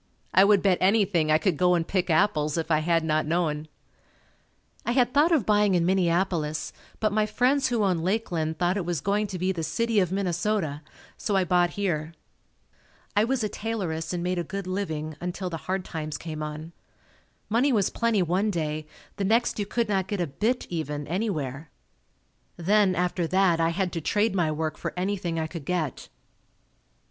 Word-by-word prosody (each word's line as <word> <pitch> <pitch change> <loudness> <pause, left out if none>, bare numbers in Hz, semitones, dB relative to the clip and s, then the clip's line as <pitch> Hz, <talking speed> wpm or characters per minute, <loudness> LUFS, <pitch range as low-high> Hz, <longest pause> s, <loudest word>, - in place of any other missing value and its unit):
I 190 - +7
would 200 -1 +4
bet 190 -3 +3
anything 185 -5 +3
I 155 - +6
could 160 0 0
go 180 +1 +4
and 165 -1 -1
pick 185 -2 0
apples 155 -3 +2
if 165 0 -2
I 155 - +4
had 165 +1 +1
not 155 -1 0
known. 155 -2 0 1.2
I 240 - 0
had 250 -1 +2
thought 300 +4 +4
of 300 - +3
buying 210 -2 +3
in 170 -1 +2
Minneapolis, 170 -4 0 0.3
but 215 -1 +1
my 215 0 +2
friends 260 +5 +2
who 235 -4 0
owned 180 -5 +1
Lakeland 175 -5 -1
thought 180 +2 +1
it 195 - -1
was 175 -3 -1
going 205 +6 0
to 190 -2 -5
be 185 +2 0
the 175 -3 -4
city 225 +8 0
of 180 -3 +1
Minnesota, 180 -4 -1 0.4
so 205 - -1
I 190 - +3
bought 175 0 +2
here. 165 -5 -2 1.0
I 205 - +4
was 255 -1 0
a - - +1
tailoress 185 -8 -3
and 175 -1 -2
made 180 0 -1
a - - -1
good 195 +3 -5
living 160 -5 -3
until 180 +1 -4
the 165 - -3
hard 190 0 -1
times 155 -2 -4
came 155 -2 -6
on. 155 +2 -6 0.8
Money 245 +6 +2
was 205 -6 +2
plenty 230 -5 +1
one 185 +5 +1
day. 155 -4 -2 0.3
The 200 - -1
next 225 +3 +2
you 205 - -2
could 235 +1 0
not 190 -3 0
get 205 0 -3
a 175 - +1
"bit" 220 - -1
even, 150 -3 -3
anywhere. 155 - -3 0.9
Then, 190 +2 +3
after 175 -1 0
that, 185 -1 +3
I 165 0 +3
had 180 +1 -1
to 165 - -3
trade 210 +6 +1
my 175 -5 +1
work 155 0 -2
for - - -5
anything 180 -3 -1
I 160 - -1
could 160 -1 -7
get. 160 -4 -3
180 Hz, 190 wpm, -26 LUFS, 160-205 Hz, 1.2 s, I